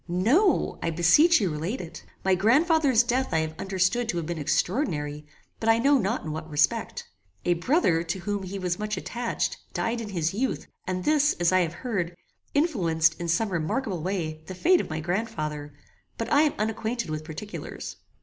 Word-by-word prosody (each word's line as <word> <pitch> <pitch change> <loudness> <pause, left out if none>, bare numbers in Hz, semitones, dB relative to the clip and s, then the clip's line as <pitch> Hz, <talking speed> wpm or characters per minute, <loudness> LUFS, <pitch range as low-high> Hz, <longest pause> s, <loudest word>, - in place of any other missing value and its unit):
"No. 240 - +2
I - - 0
beseech 180 - +5
you 190 -6 0
relate 165 - -3
it. 170 -2 -8 0.2
My 190 - +4
grandfather's 265 - +4
death 255 +2 0
I 160 - +3
have 160 0 -3
understood 195 +5 0
to 175 - -1
have 170 - -2
been 170 0 -4
extraordinary, 150 - -1 0.3
but 225 - 0
I 225 - +6
know 275 +4 +4
not 220 +3 -1
in 155 - -3
what 160 +1 -6
respect. 155 +10 0 0.4
A 175 - +4
brother, 175 - +2
to 170 +3 -3
whom 205 +2 -2
he 190 +1 -5
was 180 -1 -2
much 210 -1 -2
attached, 235 +5 -2 0.2
died 230 +1 -1
in 215 - -6
his 170 -4 -1
youth, 250 +6 -1 0.2
and 185 0 -2
this, 300 +2 +3
as 175 0 +1
I 185 - +4
have 170 -2 0
heard, 180 -8 -2 0.4
influenced, 170 - +2
in 170 - -3
some 170 +6 +1
remarkable 180 +3 -2
way, 165 -4 -3
the 185 - -6
fate 350 - +4
of - - -8
my 155 0 -3
grandfather; 155 -5 -3 0.5
but 230 - -2
I 285 - +6
am 305 -2 +3
unacquainted 220 -1 -2
with 155 0 -3
particulars." 160 +7 -7
190 Hz, 190 wpm, -26 LUFS, 165-235 Hz, 0.5 s, I